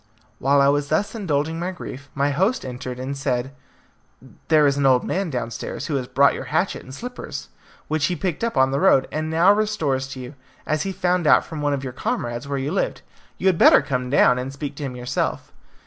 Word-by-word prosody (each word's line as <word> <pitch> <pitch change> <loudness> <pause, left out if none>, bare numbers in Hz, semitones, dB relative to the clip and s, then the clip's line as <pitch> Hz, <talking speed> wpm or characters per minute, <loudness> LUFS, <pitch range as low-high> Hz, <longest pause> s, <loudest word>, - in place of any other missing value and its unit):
While 140 +1 +3
I 140 - +5
was 145 0 +2
thus 180 +7 0
indulging 160 -6 -1
my 175 +2 -2
grief 145 -6 -8
my 140 0 +1
host 190 - 0
entered, 125 0 -6
and 130 +2 -4
said, 135 -1 -2 0.9
"There 155 -2 +5
is 140 -1 +3
an 140 -1 +2
old 130 -2 +4
man 190 -1 -1
downstairs 120 -4 -4
who 155 - -2
has 125 -2 -4
brought 140 +2 +4
your - - -6
hatchet - - -1
and 130 - -12
slippers, 245 - -7 0.4
which 155 -1 0
he 175 - 0
picked 180 +1 -3
up 230 - -1
on 130 0 +4
the 140 - 0
road, 175 -8 +4
and 155 +1 -2
now 170 +5 +5
restores 195 -12 0
to 135 -1 -8
you, 125 +2 -8 0.3
as 155 0 0
he 195 - -2
found 180 -2 0
out - - +5
from 160 -2 -6
one 145 -1 +1
of 140 -1 -3
your 130 -2 -5
comrades 120 +1 -3
where 140 0 -2
you 135 +2 -2
lived. 195 - -2 0.3
You - - -6
had 185 -3 +3
better - - +7
come 125 -2 -2
down 125 -2 +4
and 130 +1 -4
speak 140 +1 -6
to - - -5
him 130 -3 -4
yourself." 125 0 -3
140 Hz, 225 wpm, -22 LUFS, 130-165 Hz, 0.9 s, better